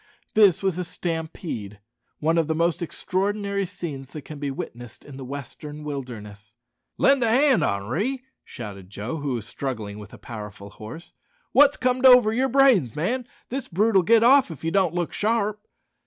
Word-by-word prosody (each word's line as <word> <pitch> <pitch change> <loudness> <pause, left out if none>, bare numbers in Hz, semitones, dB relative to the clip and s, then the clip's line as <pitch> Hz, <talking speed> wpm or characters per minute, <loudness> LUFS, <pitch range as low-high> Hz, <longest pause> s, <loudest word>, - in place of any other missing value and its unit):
This 200 -4 +5
was 190 -2 0
a - - -1
stampede, 160 - -5 0.4
one 165 +2 +2
of 160 - +1
the 160 - 0
most 170 +2 +1
extraordinary 200 +3 -1
scenes 145 -8 -7
that 150 - -7
can 150 -2 -9
be 145 -1 -2
witnessed 120 -3 -8
in 145 - -11
the 135 - -8
western 145 +3 -8
wilderness. 115 -7 -7 0.4
"Lend 275 -2 +4
a 230 - +2
hand, 255 - +4
Henri," 165 - -1 0.2
shouted 100 -6 -9
Joe, 110 +10 -5
who 145 -3 -2
was 115 -3 -4
struggling 110 -6 -5
with 105 -1 -11
a - - -12
powerful 105 -3 -9
horse. 120 +13 -10 0.4
"Wot's 285 +1 +6
comed 255 +1 +3
over 250 -4 +7
yer 260 +3 +1
brains, 245 - +4
man? 235 +11 -1 0.2
This 265 +2 -4
brute'll 195 +2 +3
git 225 +5 +4
off 265 0 +6
if 165 -2 -9
you 165 - -1
don't 185 -3 +2
look 175 -2 -2
sharp." 210 -1 0
165 Hz, 170 wpm, -24 LUFS, -, 0.4 s, over